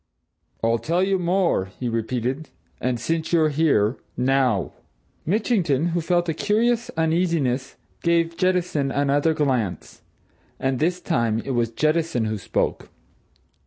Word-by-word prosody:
"I'll 115 0 +2
tell 170 +7 0
you 190 0 +1
more!" 180 - +1
he 125 - -2
repeated. 120 +5 -2 0.3
"And, 125 -2 -1
since 160 +7 -2
you're 160 -2 +4
here 140 -7 +2 0.2
now!" 125 -5 +1 0.5
Mitchington, 175 - +1
who 170 0 -1
felt 175 +1 +1
a 165 - 0
curious 230 +7 +1
uneasiness, 160 -6 0 0.3
gave 170 0 +1
Jettison 180 -6 +1
another 145 +3 +1
glance. 125 - -1 0.6
And 135 -1 0
this 175 +3 +1
time 115 -11 0
it 135 - -2
was 120 -2 +1
Jettison 155 -1 0
who 110 -1 -2
spoke. - - -2
155 Hz, 125 wpm, -23 LUFS, 125-170 Hz, 0.6 s, you're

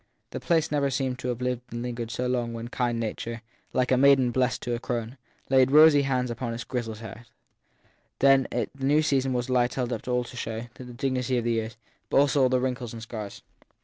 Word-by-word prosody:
The - - -4
place 160 -3 +1
never 145 -2 +1
seemed 130 -1 -2
to - - -4
have 125 -1 -3
lived 125 -1 -1
and 120 +1 -4
lingered 120 -2 -4
so 120 +2 -3
long 125 -2 0
as 115 - -6
when 115 0 -6
kind 120 -2 -1
nature, 115 +1 -4 0.3
like 125 0 0
a 130 - +4
maiden 135 -2 +5
blessing 125 -1 0
a 120 - -2
crone, 120 0 -4 0.3
laid 130 -1 +4
rosy 150 0 +7
hands 130 -3 0
on 120 0 -4
its 120 - -5
grizzled 115 -3 -4
head. 115 +2 -10 0.9
Then 135 -1 +4
the - - -1
new 145 +3 +3
season 135 -3 +1
was 125 -1 -1
a 130 - -1
light 125 -1 +2
held 125 -2 -1
up 115 - -4
to 125 -1 -1
show 115 -2 -4
all 120 - -10
the 130 - -11
dignity 125 +1 -1
of 120 - -1
the 120 - 0
years, 110 -1 -2 0.3
but - - +1
also 140 0 +4
all 130 - +4
the 130 0 +2
wrinkles 125 -2 -3
and 115 - -8
scars. 110 -3 -7
125 Hz, 225 wpm, -26 LUFS, 120-130 Hz, 0.9 s, rosy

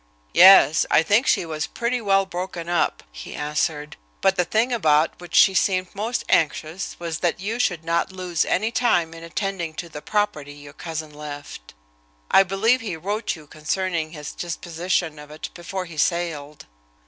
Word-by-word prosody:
"Yes, 175 -5 +8
I 160 - +5
think 205 +9 +3
she - - +3
was 155 -3 -3
pretty 240 +1 -2
well 195 -2 +3
broken 175 -2 -5
up," 175 -2 0
he - - -9
answered, 150 0 -2 0.2
"but 195 0 +3
the 180 -2 +1
thing 225 +7 +1
about 155 -8 +2
which 175 -1 -8
she 195 - +7
seemed 185 -1 +1
most 225 +5 -2
anxious 160 +3 0
was 165 -2 -4
that 175 -1 0
you 215 +5 -3
should 175 -9 0
not 170 +2 0
lose 180 -3 -1
any 220 +4 0
time 175 -9 +1
in 165 0 -10
attending 170 -1 -3
to 170 +1 -6
the 150 -1 -8
property 205 -9 -1
your 145 0 -13
cousin 160 -1 -6
left. 145 - -9 0.6
I - - +8
believe 205 +7 +2
he 195 -7 -4
wrote 205 +7 -2
you 155 -2 -13
concerning 160 +2 -2
his 150 -2 -8
disposition 170 -1 -3
of 150 0 -12
it 155 +1 -8
before 185 +1 -5
he 170 -3 -11
sailed." 150 -3 -2
170 Hz, 170 wpm, -23 LUFS, 155-195 Hz, 0.6 s, Yes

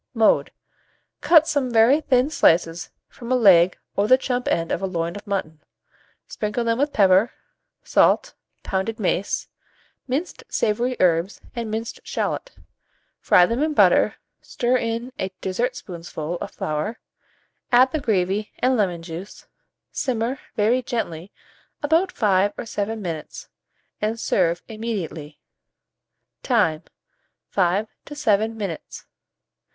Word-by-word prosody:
Mode. 225 -1 +3 0.7
Cut 320 -2 +6
some 285 -6 0
very 235 +6 +5
thin 265 0 +2
slices 170 - +2 0.2
from 240 0 -9
a - - +4
leg 185 -7 +5 0.2
or 200 +1 +1
the 255 - +6
chump 250 -1 -2
end 165 0 0
of - - -1
a 195 - -1
loin 170 -2 -3
of 205 - -10
mutton; 160 -6 -3 0.7
sprinkle 210 +3 -3
them 230 +1 0
with 290 +1 +1
pepper, 195 +1 +4 0.5
salt, - - +3 0.3
pounded 195 +4 -2
mace, 195 -1 -1 0.6
minced 285 +8 -3
savoury 240 +4 0
herbs, 175 +2 +2 0.2
and 230 -2 -4
minced 225 +1 -4
shalot; - - -3 0.7
fry 180 - +5
them 230 +8 -1
in 305 0 0
butter, - - +4 0.3
stir 245 +1 -1
in 235 +1 -2
a 190 - -1
dessertspoonful 180 - -4
of - - -5
flour, 155 +9 -3 0.7
add 255 +2 +6
the 310 - -1
gravy 205 -3 0
and 255 +1 +2
lemon 180 -7 0
juice, 170 +4 -9 0.5
simmer 250 +1 -2 0.2
very 225 +4 +2
gently 200 -7 -4 0.5
about 330 +5 +2
5 205 -1 +2
or - - -5
7 220 0 -3
minutes, 165 -6 -6 0.5
and 220 +2 -1
serve 175 -4 +1
immediately. 195 -9 -5 1.0
Time. 165 - +1 0.7
5 195 +3 +1 0.2
to 295 - -9
7 225 -5 +1
minutes. 195 -7 -6
215 Hz, 125 wpm, -23 LUFS, 180-245 Hz, 1.0 s, Cut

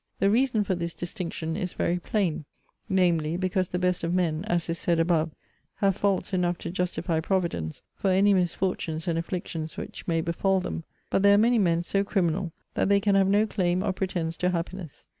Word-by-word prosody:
The 195 +1 +3
reason 235 -2 +2
for 190 - -1
this 170 -1 -3
distinction 170 -3 -4
is 185 -3 -3
very 175 +1 0
plain; 175 -5 -1 0.4
namely, 170 -4 +2
because 185 0 0
the 180 - -2
best 180 -1 0
of 170 +2 0
men 165 -2 0
[as 175 -6 0
is 165 0 -3
said 170 -1 +1
above,] 165 -1 +2 0.5
have 195 -2 +2
faults 200 -1 0
enough 175 -1 +1
to - - -6
justify 175 -2 -1
Providence 165 - -2
for 195 - 0
any 195 +2 +4
misfortunes 175 -3 -1
and 165 -1 +1
afflictions 165 -2 -4
which - - -7
may 165 -1 +1
befall 190 +4 +1
them; 170 -2 -4 0.3
but - - +2
there 200 0 +6
are - - +5
many 235 +2 +4
men 170 -3 +2
so 195 +3 +1
criminal, 180 -3 0 0.2
that - - +1
they 200 0 +5
can 200 0 +2
have 195 -1 +4
no 205 +2 +4
claim 185 -3 0
or 190 - 0
pretence 175 -4 -2
to 180 - +1
happiness. 175 -2 -5
180 Hz, 195 wpm, -27 LUFS, 170-195 Hz, 0.5 s, there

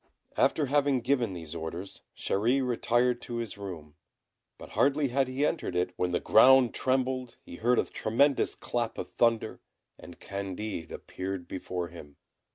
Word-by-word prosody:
After 150 - +2
having 140 -1 +2
given 125 -4 +1
these 80 -3 -7
orders, 85 +3 -6 0.2
Chéri 125 +7 +1
retired 120 0 +1
to 120 - -6
his 115 -2 -4
room; 90 -7 -8 0.6
but - - -11
hardly 140 0 +2
had 135 +1 +1
he 130 +3 0
entered 150 - -2
it, 90 0 0
when 90 - 0
the 90 - +1
ground 130 +2 +6
trembled, 130 -1 -1
he 85 - -9
heard 120 +4 +2
a - - +2
tremendous 135 +5 +1
clap 120 -2 -3
of - - -6
thunder, 115 -2 +1 0.4
and 85 -1 -12
Candid 100 -3 -5
appeared 95 -1 -6
before 90 -2 -4
him. 75 -4 -12
115 Hz, 155 wpm, -29 LUFS, 90-130 Hz, 0.6 s, ground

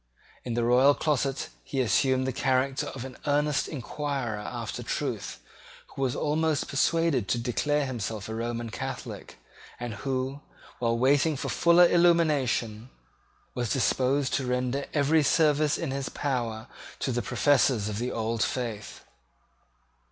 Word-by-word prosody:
In 120 -2 -3
the 120 - +1
royal 130 +4 +5
closet 140 -3 -1
he 135 - -4
assumed 130 +2 +2
the 130 - -1
character 130 +2 0
of 130 -1 -6
an 130 - -9
earnest 145 0 +1
inquirer 135 -5 -3
after 105 - -5
truth, - - -3 0.5
who - - -8
was 130 -2 0
almost 155 0 0
persuaded 145 -5 +1
to 120 - +1
declare 145 +5 0
himself 110 -5 -4
a 110 - -5
Roman 115 0 -3
Catholic, 130 +3 -6 0.4
and 120 -2 -4
who, 130 +5 -3 0.4
while 115 -1 +1
waiting 140 +4 +3
for - - -4
fuller 170 +1 +5
illumination, 145 -10 +2 0.6
was 120 -3 -2
disposed 135 +1 +1
to 130 - 0
render 125 +2 -1
every 150 +2 +3
service 150 0 +3
in 165 -5 -3
his 135 0 -3
power 120 -5 -2 0.3
to 135 - -2
the 120 0 -1
professors 130 -7 +2
of 105 0 -3
the 125 +1 -2
old 115 0 -2
faith. 115 -5 -3
130 Hz, 140 wpm, -27 LUFS, 120-145 Hz, 0.6 s, royal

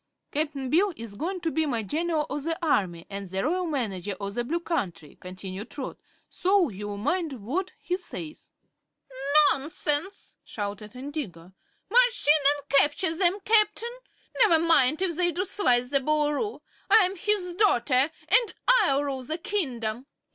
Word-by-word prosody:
"Cap'n 285 -3 -2
Bill 380 +5 +3
is 225 -2 -7
goin' 355 - -4
to 330 -2 -1
be 315 +2 0
my 235 -5 -1
General 310 - -1
o' 290 - -4
the 325 +3 -3
Army 175 - 0
an' 200 0 -6
the 190 +2 -3
Royal 355 +5 0
Manager 205 - -3
o' 200 -1 -4
the 240 +4 -2
Blue 330 +8 -2
Country," 175 - -4
continued 185 +3 -8
Trot; 275 - -6 0.3
"so 375 -3 +2
you'll 205 0 -6
mind 325 - -1
what 270 - -4
he 360 - -3
says." 330 -4 -9 1.0
"Nonsense!" 300 +5 -2
shouted 210 +1 -6
Indigo. 250 - -7 0.3
"March - - +3
in 300 0 +5
and 285 0 -14
capture 295 +5 +3
them, 360 +2 +2
Captain! 435 +2 +2 0.5
Never 425 -9 +6
mind 315 -1 +3
if 350 -3 0
they 350 +1 +2
do 365 +3 -2
slice 250 -11 +1
the 280 - +3
Boolooroo. 300 - -1 0.3
I'm 390 -3 +5
his 375 -1 +1
daughter, 280 - +3 0.2
and 480 -3 +3
I'll 285 - +4
rule 275 -2 -3
the 310 +6 -3
kingdom." 260 - -3
295 Hz, 155 wpm, -26 LUFS, 235-360 Hz, 1.0 s, Never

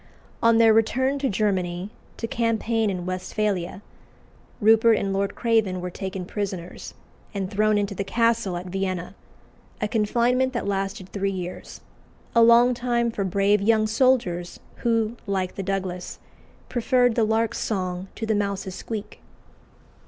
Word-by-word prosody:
On 230 0 +5
their 225 -1 +6
return 260 +5 +2
to 270 -1 0
Germany, 190 -2 -1 0.3
to - - -3
campaign 230 -1 0
in 180 -2 -3
Westphalia, 185 0 -2 0.8
Rupert 225 0 +5
and 195 -1 -1
Lord 195 0 -1
Craven 220 -6 +1
were 180 0 -5
taken 190 0 -5
prisoners 185 -3 -5 0.4
and 190 -2 -3
thrown 215 +1 +2
into 200 -1 -1
the 195 - -3
castle 230 -3 +1
at 175 - -6
Vienna 185 -1 -3 0.7
a 215 - 0
confinement 240 +4 +1
that 240 - -2
lasted 195 -1 -3
three 200 -1 -1
years, 180 -2 -6 0.5
a 235 - +5
long 235 +2 +6
time 240 -1 0
for 205 - -2
brave 200 +2 +2
young 215 +1 +3
soldiers 215 -7 +1 0.2
who, 230 -1 0
like 190 -2 -1
the - - -5
Douglas, 185 -2 -3 0.5
"preferred 245 0 +2
the 230 - +2
lark's 220 +1 +1
song 185 -3 -2
to 225 - -4
the 220 - +1
mouse's 200 -2 -2
squeak." 210 +2 -6
210 Hz, 145 wpm, -24 LUFS, 190-230 Hz, 0.8 s, their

